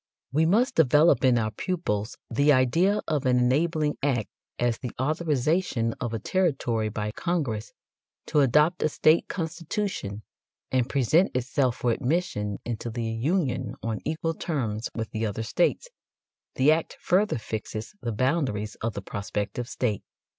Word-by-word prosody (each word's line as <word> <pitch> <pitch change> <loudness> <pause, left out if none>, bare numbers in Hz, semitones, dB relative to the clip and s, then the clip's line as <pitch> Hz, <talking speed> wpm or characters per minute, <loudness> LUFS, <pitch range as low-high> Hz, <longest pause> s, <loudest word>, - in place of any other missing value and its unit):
We 160 +3 +3
must 225 +9 +3
develop 150 -2 +5
in 125 -2 +5
our 110 -1 0
pupils 110 - -2
the 145 +1 +3
idea 165 +11 +3
of 145 -4 0
an 125 -1 +4
enabling 150 +4 +1
act 130 -6 0 0.3
as 120 -1 0
the 125 - -4
authorization 150 -4 0
of 120 - -2
a 115 - -2
territory 125 - 0
by 105 0 -3
Congress 135 -8 -2 0.5
to 150 - +1
adopt 150 +6 +4
a 155 - +2
state 155 +2 +3
constitution 165 - -3 0.5
and 130 -1 +1
present 145 - +2
itself 125 0 +1
for 125 -1 0
admission 125 - -1
into 120 0 -4
the 115 0 -3
Union 130 - -1
on 110 -1 -2
equal 160 +1 -1
terms 120 - -2
with 110 -1 -4
the 110 - -3
other 105 +2 -3
states; 175 - +1 0.7
the 135 +4 +5
act 160 +1 0
further 200 0 +2
fixes 110 - -5
the 115 - -2
boundaries 115 -4 0
of 115 0 -1
the 100 - -5
prospective 105 +4 -4
state. 110 -6 -1
130 Hz, 145 wpm, -26 LUFS, 115-160 Hz, 0.7 s, develop